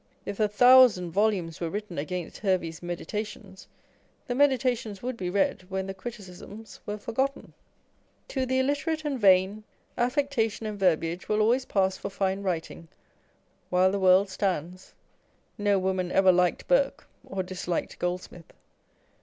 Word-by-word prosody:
If 200 - -5
a 215 - +3
thousand 240 -5 +6
volumes 190 -4 0
were 170 - -1
written 205 -3 -5
against 175 +3 -5
Hervey's 180 -5 -1
Medi 175 -1 -5
tations, 210 -2 -6 0.6
the 245 - -2
Meditations 245 -6 +1
would 255 0 -3
be 185 -5 -4
read 185 -1 0
when 190 0 -2
the 195 - -5
criticisms 205 0 -10
were 210 0 -3
forgotten. 265 +6 -3 0.8
To 260 -2 -2
the 260 +1 +1
illiterate 290 +4 -1
and 280 -3 -2
vain, 195 +1 +4 0.4
affectation 245 -4 0
and 210 -1 -5
verbiage 175 -1 0
will 210 0 +2
always 240 +4 +2
pass 190 -1 +1
for - - -5
fine 195 0 -1
writing, 170 -3 -4 0.8
while 185 +1 +3
the 200 - -1
world 190 +1 +5
stands. 185 -1 -3 0.6
No 205 -1 +2
woman 185 -1 -1
ever 190 -1 +5
liked 180 0 +1
Burke, - - +1 0.2
or 195 -1 -4
disliked 180 -1 -4
Gold 180 +1 -2
smith. 170 -2 -14
195 Hz, 145 wpm, -27 LUFS, 185-225 Hz, 0.8 s, thousand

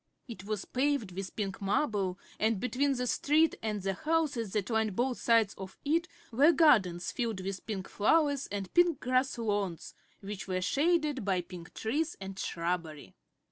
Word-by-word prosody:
It 200 -6 -9
was 210 -2 -3
paved 265 -6 0
with 190 +1 -6
pink 195 -2 -3
marble 195 -3 0 0.2
and 220 -1 +2
between 270 +4 +1
the 250 -1 -2
street 300 +6 +3
and 210 -3 -3
the 195 0 0
houses 290 -5 -1
that 210 0 -1
lined 220 -3 +1
both 250 +2 0
sides 230 -4 +3
of 190 -1 -8
it 330 +4 +1 0.2
were 280 +8 +6
gardens 190 - +4
filled 225 -6 -2
with 190 0 -5
pink 195 -4 -4
flowers 285 +5 +2
and 200 -2 -5
pink 345 -4 +4
grass 255 +1 +1
lawns, 205 -6 -2 0.3
which 200 0 -7
were 185 -1 -1
shaded 300 - +1
by 190 -2 +1
pink 175 -1 -11
trees 300 +9 -1
and 195 0 -7
shrubbery. 170 -3 -3
220 Hz, 165 wpm, -31 LUFS, 190-280 Hz, 0.3 s, were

